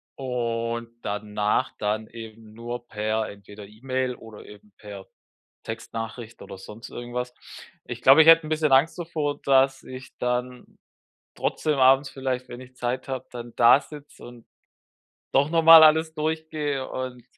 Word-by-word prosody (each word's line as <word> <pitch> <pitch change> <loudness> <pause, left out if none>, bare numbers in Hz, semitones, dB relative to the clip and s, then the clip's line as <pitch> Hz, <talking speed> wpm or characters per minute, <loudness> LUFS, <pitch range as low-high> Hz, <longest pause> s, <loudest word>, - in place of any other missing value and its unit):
und 115 -2 -3
danach 105 +4 -2
dann 110 +1 -2
eben 110 -1 -12
nur 120 +1 -7
per 110 +1 -2
entweder 100 +1 -12
E-Mail 130 +3 -3
oder 110 -3 -13
eben 105 0 -16
per 100 -2 -10 0.6
Textnachricht 115 +1 -7
oder - - -10
sonst 105 +4 -11
irgendwas. 125 +1 -6 0.5
Ich 120 0 -8
glaube, 135 +5 +7
ich - - -1
hätte 165 -1 +7
'n - - -8
bisschen 155 -2 0
Angst 135 +7 +3
davor, 155 -4 -3
dass 135 0 +2
ich 130 +1 -11
dann 125 0 -4 0.6
trotzdem 150 -3 -1
abends 135 +2 +4
vielleicht, 130 -1 -4
wenn 120 - -9
ich 130 0 -15
Zeit 125 +2 -3
habe, 130 -1 -4
dann 120 -1 -9
da 120 +3 +6
sitze 150 -1 -13
und 120 -1 -14 0.9
doch 140 +3 +2
nochmal 165 -1 +8
alles 160 +1 +3
durchgehe 155 -3 -3
und, 125 -2 -6
125 Hz, 145 wpm, -24 LUFS, 115-135 Hz, 0.9 s, nochmal